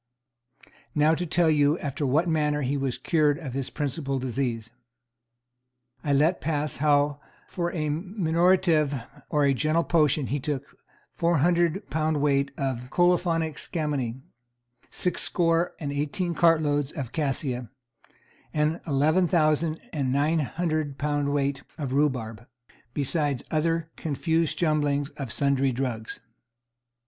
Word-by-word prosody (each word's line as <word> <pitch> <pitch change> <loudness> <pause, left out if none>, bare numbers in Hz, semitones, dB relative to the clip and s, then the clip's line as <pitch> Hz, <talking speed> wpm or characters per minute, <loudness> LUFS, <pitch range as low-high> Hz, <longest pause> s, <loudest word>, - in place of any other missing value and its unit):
Now 150 +1 +4
to 175 +2 -2
tell 165 0 +3
you 145 +1 +3
after 145 -2 -3
what 155 +7 +2
manner 150 -2 +1
he 135 +2 0
was 135 -3 -1
cured 150 -3 +2
of 145 -7 -7
his 135 -1 -3
principal 140 -1 -2
disease. 120 -3 -2 1.3
I 145 - 0
let 150 +6 +3
pass 150 -1 -2
how 145 0 +2 0.3
for 175 -1 -2
a 155 -3 -2
minorative 170 -3 +2 0.3
or 145 -2 +3
gentle 155 +5 +1
potion 150 -4 +2
he 145 +3 -2
took 140 0 -4 0.4
four 170 0 +1
hundred 175 +4 +2
pound 155 0 +1
weight 140 -1 +2
of 130 -3 -3
colophoniac 170 -2 +1
scammony, 140 -7 -3 0.7
six 180 -2 -2
score 165 0 +1
and 145 -4 -4
eighteen 155 +5 -1
cartloads 150 -4 +2
of 135 -8 -5
cassia, 135 -5 -2 0.9
an 155 +2 +1
eleven 155 +5 +3
thousand 160 -1 +2
and 140 -5 -1
nine 150 +4 +2
hundred 155 -1 -2
pound 145 -1 0
weight 140 -1 0 0.2
of 140 -5 -3
rhubarb, 125 -6 -1 0.5
besides 145 -2 0
other 165 +1 0
confuse 160 +1 0
jumblings 145 -3 +1
of 135 -5 -6
sundry 140 -1 +2
drugs. 120 -3 -4
150 Hz, 125 wpm, -26 LUFS, 140-165 Hz, 1.3 s, Now